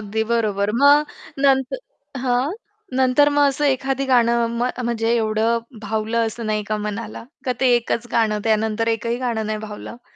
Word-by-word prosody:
अगदी 210 +1 -2
बरोबर. 210 -3 0
मग 290 +1 +6 0.4
नंत 265 -1 +3 0.5
हां, 255 +4 0 0.5
नंतर 260 +3 +4
मग 285 -1 +5
असं 290 +2 -2
एखादं 270 +1 -2
गाणं 235 -1 +3 0.2
म 245 - +1 0.2
म्हणजे 225 -1 0
एवढं 220 +1 +1 0.3
भावलं 220 +2 0
असं 230 +1 -7
नाही 210 0 -1
का 215 - +1
मनाला 215 +1 -6 0.2
का? - - +3
ते 260 -2 +4
एकच 240 0 -2
गाणं 215 -2 +2
त्यानंतर 220 +1 +1
एकही 230 +2 -3
गाणं 220 -2 -1
नाही 215 - -3
भावलं. 230 +3 -9
230 Hz, 160 wpm, -21 LUFS, 220-255 Hz, 0.5 s, मग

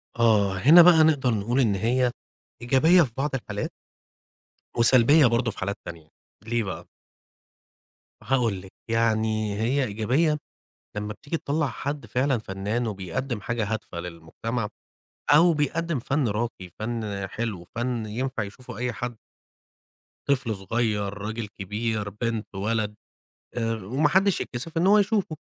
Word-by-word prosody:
آه، 105 -5 +3
هنا 150 - +8
بقى 165 -2 +7
نقدر 145 -5 +3
نقول 115 +5 0
إن 110 -6 +3
هي 120 +5 +1 0.5
إيجابية 145 +9 +5
في 135 -8 0
بعض 140 0 -1
الحالات 105 -5 -4 1.1
وسلبية 130 +5 +6
برضه 115 0 +1
في - - -12
حالات 100 +2 -2
تانية، 85 -3 -9 0.4
ليه 120 0 0
بقى؟ 95 -3 -6 1.4
هاقول 115 -5 +1
لكِ، 95 0 -14 0.2
يعني 110 -2 +1
هي 130 +5 +1
إيجابيّة 130 +8 +1 0.6
لمّا 105 0 -3
بتيجي 145 +10 -4
تطلّع 150 0 -1
حد 140 +2 -4
فعلًا 130 +4 +1
فناّن 105 +3 -3
وبيقدّم 105 +4 -4
حاجة 110 0 -2
هادفة 105 -5 -5
للمجتمع 90 +7 -4 0.6
أو 165 +4 +6
بيقدّم 155 +1 -1
فَن 135 +2 0
راقي، 105 -3 -3
فَن 110 -3 -3
حلو، 105 -3 -4
فَن 120 -1 -2
ينفع 120 +2 -3
يشوفه 125 +4 -10
أي 125 +1 -2
حد 120 +2 -5 1.1
طفل 130 -5 +1
صغير، 105 0 -1
راجل 105 +2 -5
كبير، 105 +1 -3
بنت، 110 +2 -3
ولد 105 +1 -1 0.6
آآ 115 -1 0
وما 120 +8 0
حدّش 190 +4 +3
يتكسف 140 +7 -5
إن 165 +3 +2
هو 205 +2 +6
يشوفه، 200 -5 +1
115 Hz, 135 wpm, -25 LUFS, 105-135 Hz, 1.4 s, هنا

